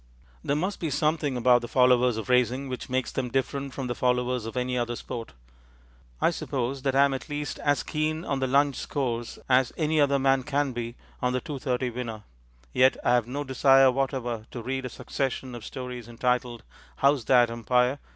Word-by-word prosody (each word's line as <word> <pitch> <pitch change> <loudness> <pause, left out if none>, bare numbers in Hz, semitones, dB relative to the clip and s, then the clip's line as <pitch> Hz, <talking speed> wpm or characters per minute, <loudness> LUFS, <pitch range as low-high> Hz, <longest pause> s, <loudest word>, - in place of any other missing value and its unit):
There 140 - 0
must 185 +6 -2
be 165 - -2
something 150 -1 0
about 125 0 +4
the 120 - -5
followers 125 -1 +4
of 110 - -5
racing 125 +2 +2
which 125 +1 -6
makes 130 0 -1
them 130 -2 -2
different 135 +2 -2
from 135 - -3
the 120 - -2
followers 125 -1 0
of 115 - -6
any 125 0 -1
other 120 -1 -1
sport. 115 0 -7 0.9
I - - +3
suppose 130 +1 -3
that 135 0 0
I 140 +1 +6
am 140 - 0
at 135 - -6
least 145 0 -4
as 145 -1 +1
keen 155 +2 -2
on 140 - -1
the 130 - 0
Lunch 140 0 +3
Scores 120 -5 -3
as 130 -1 +3
any 155 -1 +2
other 140 -1 +3
man 135 0 +3
can 145 0 0
be 120 -1 -5 0.3
on 125 0 +1
the 130 - +1
Two 140 +1 -6
thirty 125 -1 -1
Winner; 115 -3 -5 0.5
yet 130 +1 +4
I 120 - +3
have 120 -2 +2
no 140 +4 -3
desire 135 0 +5
whatever 125 -4 -2
to 120 - -7
read 130 +2 -3
a - - -3
succession 130 +1 -3
of 120 -2 -8
stories 125 -1 -7
entitled 120 0 -1 0.4
_How's 140 -4 +4
That, 120 -2 +5
Umpire? 125 +3 +1
130 Hz, 200 wpm, -27 LUFS, 125-140 Hz, 0.9 s, I